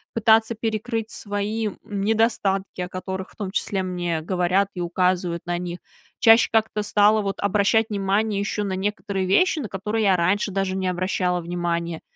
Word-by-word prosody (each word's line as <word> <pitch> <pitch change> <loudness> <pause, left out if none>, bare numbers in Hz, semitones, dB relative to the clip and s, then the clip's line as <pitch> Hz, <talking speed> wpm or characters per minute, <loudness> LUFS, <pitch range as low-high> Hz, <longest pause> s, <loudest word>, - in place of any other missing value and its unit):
пытаться 225 0 +4
перекрыть 225 0 -3
свои, 210 +2 -3
м, 200 - -6
недостатки, 200 -2 0
о 180 - -4
которых, 190 0 -5
в - - -21
том 200 -3 -5
числе, 195 -1 -1
мне 175 -3 -2
говорят 185 +3 +1
и 180 - -5
указывают 175 -1 0
на 175 0 -1
них. 175 0 -5 0.4
Чаще 225 0 +6
как-то 220 -1 +1
стала 210 +1 +4
вот 195 -1 -3
обращать 205 +3 +2
внимание 200 +1 0
еще 200 +1 -2
на 195 -2 -2
некоторые 200 0 -2
вещи, 325 - +3
на 230 - -5
которые 210 +3 -2
я 190 - +5
раньше 190 +4 +1
даже 195 0 -1
не 190 -1 -1
обращала 180 0 0
внимание. 170 -1 -3
195 Hz, 170 wpm, -23 LUFS, 180-215 Hz, 0.4 s, Чаще